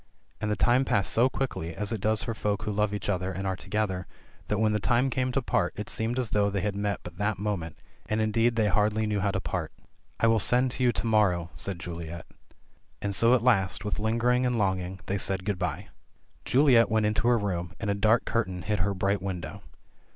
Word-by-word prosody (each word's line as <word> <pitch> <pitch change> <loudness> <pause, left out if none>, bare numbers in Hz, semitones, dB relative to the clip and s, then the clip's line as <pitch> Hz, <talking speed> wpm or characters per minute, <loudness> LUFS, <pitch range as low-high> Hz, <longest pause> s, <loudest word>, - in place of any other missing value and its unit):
And 105 - -1
the 105 - +1
time 120 +4 +3
passed 100 -7 +1
so 120 +3 +4
quickly, 105 -12 -3
as 105 +2 -3
it 110 -4 -3
does 110 0 +1
for 115 - -3
folk 105 -2 -2
who 105 - -2
love 105 0 +1
each 105 -1 -4
other 95 -2 -1
and 95 +2 -5
are 95 -1 0
together, 95 -3 -2 0.4
that 105 - 0
when 110 0 +2
the 105 - +1
time 120 +6 +2
came 130 0 0
to 135 +1 -1
part, 90 - 0
it 105 0 -5
seemed 115 +2 -1
as 125 -4 -1
though 100 -1 +2
they 100 -1 -2
had 100 0 -2
met 100 0 -2
but - - -10
that 105 0 0
moment 95 -6 -3 0.2
— - - -34
and 110 - 0
indeed 115 +2 +2
they 110 -1 +2
hardly 105 +2 +1
knew 105 -1 0
how 100 +1 +1
to 95 -1 -1
part. - - -3 0.5
"I - - +3
will 115 -1 +4
send 125 +4 +3
to 130 - -1
you 125 - +4
to - - -3
morrow," 95 -6 +2
said 95 -3 -4
Juliet. 85 -1 -7 0.7
And 100 -1 -2
so 115 +6 +5
at 120 - 0
last, 100 -6 +2
with 105 - -2
lingering 120 +3 +1
and 125 -1 +1
longing, 95 -2 -1
they 100 +1 -2
said 95 0 0
good 100 -3 -1
bye. 90 -5 -3 0.6
Juliet 130 -4 +5
went 110 -1 +2
into 110 +3 +1
her 120 -1 +5
room, 90 -5 -3
and 110 -3 -1
a - - +2
dark 110 +3 +2
curtain 95 -6 -2
hid 105 -1 -1
her 100 +3 0
bright 100 +1 0
win 95 -2 -3
dow. - - -8
105 Hz, 235 wpm, -27 LUFS, 95-115 Hz, 0.7 s, so